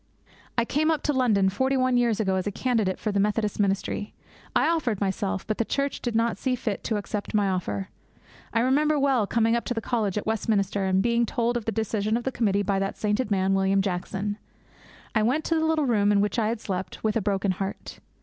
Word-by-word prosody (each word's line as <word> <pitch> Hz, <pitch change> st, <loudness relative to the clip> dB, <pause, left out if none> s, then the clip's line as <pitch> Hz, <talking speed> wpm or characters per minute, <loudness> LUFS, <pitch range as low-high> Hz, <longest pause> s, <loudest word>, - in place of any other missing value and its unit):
I 235 Hz, -, +3 dB
came 305 Hz, +6 st, +1 dB
up 315 Hz, -3 st, 0 dB
to 295 Hz, -, +1 dB
London 220 Hz, -7 st, +3 dB
forty 260 Hz, +8 st, +1 dB
one 255 Hz, -1 st, +2 dB
years 235 Hz, -3 st, +2 dB
ago 195 Hz, -3 st, +1 dB
as 185 Hz, +1 st, -1 dB
a -, -, 0 dB
candidate 220 Hz, -4 st, 0 dB
for 215 Hz, -, -2 dB
the 200 Hz, -, 0 dB
Methodist 210 Hz, +1 st, 0 dB
ministry. 200 Hz, +1 st, -1 dB, 0.4 s
I -, -, +4 dB
offered 255 Hz, -, 0 dB
myself, 195 Hz, 0 st, -1 dB
but 215 Hz, -, -3 dB
the -, -, +3 dB
Church 280 Hz, +4 st, -2 dB
did 240 Hz, -2 st, -2 dB
not 230 Hz, +1 st, +1 dB
see 260 Hz, -2 st, 0 dB
fit 220 Hz, -4 st, -3 dB
to 220 Hz, -, 0 dB
accept 205 Hz, +1 st, -4 dB
my 205 Hz, -1 st, +3 dB
offer. 135 Hz, -, -2 dB, 0.6 s
I 230 Hz, -, +2 dB
remember 295 Hz, +5 st, +3 dB
well 270 Hz, -7 st, +2 dB
coming 230 Hz, +1 st, +2 dB
up 235 Hz, -, -1 dB
to 245 Hz, -, -2 dB
the -, -, 0 dB
college 215 Hz, -4 st, -1 dB
at 210 Hz, -, -2 dB
Westminster 205 Hz, -3 st, 0 dB
and 190 Hz, 0 st, +2 dB
being 235 Hz, 0 st, +2 dB
told 235 Hz, +2 st, 0 dB
of 235 Hz, -3 st, -2 dB
the 225 Hz, -, 0 dB
decision 220 Hz, 0 st, 0 dB
of 240 Hz, -, -5 dB
the 265 Hz, -, -1 dB
committee 205 Hz, -5 st, +1 dB
by 195 Hz, -1 st, 0 dB
that 195 Hz, 0 st, -2 dB
sainted 210 Hz, +2 st, 0 dB
man, 195 Hz, -1 st, +2 dB
William 195 Hz, 0 st, +2 dB
Jackson. 195 Hz, +2 st, -3 dB, 0.7 s
I 215 Hz, -, +2 dB
went 255 Hz, +8 st, +1 dB
to 330 Hz, -, +1 dB
the 320 Hz, -, +1 dB
little 315 Hz, -2 st, +2 dB
room 210 Hz, -5 st, +3 dB
in 205 Hz, -, +4 dB
which 205 Hz, +3 st, +1 dB
I 215 Hz, -, +1 dB
had 230 Hz, 0 st, -1 dB
slept 190 Hz, -2 st, -5 dB
with 215 Hz, -1 st, +1 dB
a 225 Hz, -, +1 dB
broken 195 Hz, -1 st, 0 dB
heart. 195 Hz, +2 st, -5 dB
215 Hz, 230 wpm, -26 LUFS, 200-240 Hz, 0.7 s, I